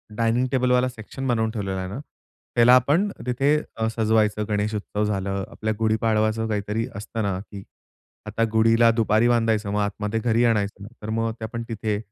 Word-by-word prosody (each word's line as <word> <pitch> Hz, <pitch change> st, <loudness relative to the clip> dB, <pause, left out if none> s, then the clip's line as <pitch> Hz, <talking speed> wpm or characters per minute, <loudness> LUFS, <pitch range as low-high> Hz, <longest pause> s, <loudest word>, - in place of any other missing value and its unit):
Dining 115 Hz, +2 st, +1 dB
टेबलवाला 125 Hz, -1 st, +2 dB
section 125 Hz, +3 st, -7 dB
बनवून 110 Hz, -3 st, +1 dB
ठेवलेला 100 Hz, -4 st, -3 dB
आहे 95 Hz, -, -4 dB
ना, 105 Hz, -, -6 dB, 0.6 s
त्याला 120 Hz, +1 st, +7 dB
आपण 145 Hz, -, +3 dB, 0.2 s
तिथे 135 Hz, +4 st, +2 dB, 0.2 s
अ, 110 Hz, 0 st, 0 dB
सजवायचं. 110 Hz, -1 st, +2 dB
गणेश 105 Hz, +1 st, 0 dB
उत्सव 105 Hz, 0 st, -2 dB
झालं, 100 Hz, -1 st, -2 dB
आपल्या 110 Hz, 0 st, -2 dB
गुढीपाडवाचं 110 Hz, 0 st, +1 dB
काहीतरी 105 Hz, +2 st, -2 dB
असतं 110 Hz, +2 st, -5 dB
ना 100 Hz, -2 st, -1 dB
की 100 Hz, -1 st, -10 dB, 0.6 s
आता 115 Hz, -, -1 dB
गुढीला 115 Hz, +1 st, +4 dB
दुपारी 115 Hz, 0 st, +2 dB
बांधायचं 115 Hz, -3 st, +1 dB
मग 105 Hz, -, 0 dB
आतमध्ये 105 Hz, +2 st, -2 dB
घरी 115 Hz, +1 st, +2 dB
आणायचं, 105 Hz, -3 st, 0 dB, 0.2 s
तर 105 Hz, -, -6 dB
मग 115 Hz, +1 st, 0 dB
आपण 115 Hz, +1 st, -4 dB
तिथे. 110 Hz, -2 st, -2 dB
110 Hz, 165 wpm, -24 LUFS, 105-115 Hz, 0.6 s, त्याला